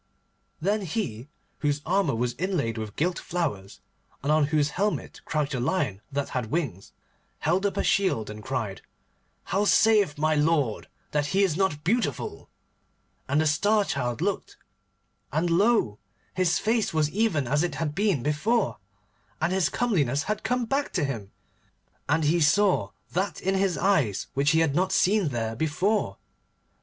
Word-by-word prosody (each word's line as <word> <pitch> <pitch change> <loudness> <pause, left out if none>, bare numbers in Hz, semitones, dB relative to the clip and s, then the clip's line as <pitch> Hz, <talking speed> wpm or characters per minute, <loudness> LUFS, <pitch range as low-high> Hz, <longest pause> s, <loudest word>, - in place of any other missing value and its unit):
Then 205 +5 0
he, 150 - -4 0.3
whose 145 0 -1
armour 175 -6 +1
was 120 +1 -1
inlaid 155 - -1
with 110 -1 -6
gilt 175 +3 0
flowers, 135 - -3 0.4
and 145 - +1
on 155 -2 +4
whose 150 -1 +1
helmet 205 +5 -2
crouched 150 -2 -1
a 125 - -1
lion 120 - -1
that 140 0 -2
had 125 -3 -2
wings, 130 - -3 0.5
held 180 +6 +1
up 200 - -5
a - - +1
shield, 185 - +1
and 105 0 -8
cried, 110 -7 -3 0.6
'How 195 +3 0
saith 210 -8 +4
my 155 +1 +2
lord 150 -6 +1 0.2
that 145 -1 0
he 195 +5 +2
is 180 -6 +1
not 175 -5 0
beautiful?' 190 - -1 0.8
And 140 +3 +2
the - - +1
Star 205 +7 +3
Child 125 -3 -2
looked, 200 +2 -2 0.7
and 165 +3 0
lo! 190 - +2 0.3
his 185 -2 +2
face 220 -5 0
was 155 -1 +2
even 185 - +1
as 150 +4 +2
it 175 - -1
had 155 -3 -2
been, 195 - +1
and 125 - -2
his 190 -2 +2
comeliness 145 - +1
had 215 +4 -2
come 245 +1 0
back 275 +5 -1
to 175 - +1
him, 110 -8 -4 0.8
and 160 +2 +2
he 165 +3 +2
saw 195 +5 +3 0.2
that 190 +1 -1
in 190 - 0
his 190 -2 +1
eyes 150 - +1
which 140 +2 +2
he 160 0 +4
had 160 -4 +2
not 185 +5 +1
seen 195 0 +3
there 115 -4 -2
before. 180 - 0
155 Hz, 160 wpm, -26 LUFS, 140-195 Hz, 0.8 s, on